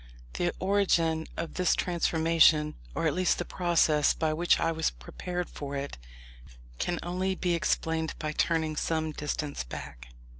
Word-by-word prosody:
The 175 0 0
origin 175 -5 +2
of 165 -1 -4
this 180 -1 +2
transformation, 165 -3 +3 0.2
or - - -1
at 155 - +2
least 185 0 +2
the 175 - -3
process 165 -4 +2
by 155 -1 0
which 170 +3 +3
I 165 - +1
was 160 0 0
prepared 175 - -5
for 140 -1 -6
it, 140 - -5 0.8
can 175 - -1
only 185 +2 -1
be 180 -1 0
explained 160 -1 0
by 155 -1 -3
turning 160 0 0
some 160 0 -1
distance 150 -1 -3
back. - - -8
165 Hz, 150 wpm, -29 LUFS, 155-175 Hz, 0.8 s, transformation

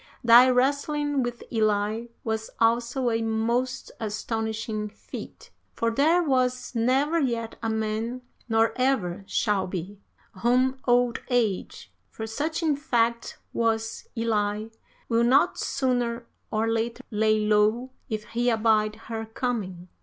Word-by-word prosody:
Thy 240 +2 +8
wrestling 285 +2 +1
with 240 -1 -4
Elli 215 +1 0
was 220 0 -2
also 235 +2 +2
a 225 0 0
most 230 +3 -1
astonishing 220 0 -3
feat, - - -10 0.2
for 230 0 0
there 315 +9 +3
was 255 -4 0
never 265 +7 +2
yet 235 -5 -1
a 225 - -1
man, 220 +3 -2 0.3
nor 225 0 +3
ever 220 -9 0
shall 205 -4 0
be, 185 +2 -6 0.4
whom 255 +2 +2
Old 245 -1 +3
Age, 230 -6 -1 0.2
for 220 - -6
such 300 +9 -2
in 310 -3 +2
fact 235 -5 0 0.2
was 225 -1 -1
Elli, 215 -1 -1 0.4
will 230 0 +2
not 275 +9 +3
sooner 245 -3 -1 0.2
or 220 +1 0
later 225 +1 -1
lay 215 0 +2
low 215 +4 +2 0.2
if 215 -2 -3
he 240 +1 +1
abide 215 -2 +2
her 225 0 -6
coming. 215 -7 -3
230 Hz, 125 wpm, -26 LUFS, 220-250 Hz, 0.4 s, Thy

